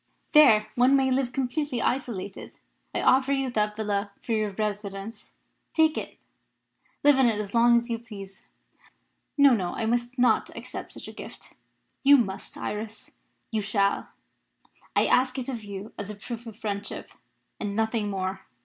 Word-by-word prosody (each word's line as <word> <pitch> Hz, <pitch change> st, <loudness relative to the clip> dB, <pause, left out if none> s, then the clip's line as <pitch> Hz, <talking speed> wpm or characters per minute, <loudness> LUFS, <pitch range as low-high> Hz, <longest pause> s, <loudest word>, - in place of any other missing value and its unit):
There 230 Hz, -9 st, +7 dB
one 250 Hz, +4 st, +4 dB
may 265 Hz, -1 st, +3 dB
live 255 Hz, -1 st, +1 dB
completely 265 Hz, 0 st, -1 dB
isolated. 230 Hz, -8 st, -3 dB, 0.4 s
I -, -, -2 dB
offer 265 Hz, +1 st, +4 dB
you 270 Hz, -2 st, 0 dB
that 210 Hz, -2 st, 0 dB
villa 205 Hz, -1 st, -1 dB
for -, -, -5 dB
your 215 Hz, -2 st, +1 dB
residence. 205 Hz, +1 st, -5 dB, 0.4 s
Take 315 Hz, -1 st, +4 dB
it; -, -, -5 dB, 0.9 s
live 290 Hz, -2 st, +6 dB
in 260 Hz, -, +6 dB
it 220 Hz, -3 st, +1 dB
as 205 Hz, -1 st, -5 dB
long 235 Hz, 0 st, +6 dB
as 235 Hz, 0 st, -1 dB
you 230 Hz, -, -1 dB
please." 200 Hz, -4 st, -10 dB, 1.0 s
"No, 280 Hz, -2 st, +7 dB
no. 185 Hz, -6 st, -1 dB
I 225 Hz, -, -2 dB
must 240 Hz, +2 st, -1 dB
not 245 Hz, -3 st, +3 dB
accept -, -, -6 dB
such -, -, -8 dB
a -, -, -7 dB
gift." -, -, -10 dB, 0.5 s
"You 285 Hz, +1 st, +8 dB
must, 195 Hz, -6 st, -3 dB
Iris 215 Hz, +1 st, -5 dB, 0.4 s
you 220 Hz, -2 st, 0 dB
shall. 200 Hz, -1 st, +1 dB, 0.9 s
I -, -, +5 dB
ask 255 Hz, +1 st, +3 dB
it 255 Hz, -, -3 dB
of 235 Hz, -4 st, -4 dB
you 200 Hz, +1 st, -7 dB
as 205 Hz, 0 st, -5 dB
a 210 Hz, -, -5 dB
proof 235 Hz, +3 st, -7 dB
of 220 Hz, -2 st, -9 dB
friendship, 205 Hz, -2 st, -4 dB, 0.5 s
and 200 Hz, -1 st, -3 dB
nothing 220 Hz, -1 st, 0 dB
more. 190 Hz, -1 st, -3 dB
225 Hz, 165 wpm, -27 LUFS, 205-255 Hz, 1.0 s, You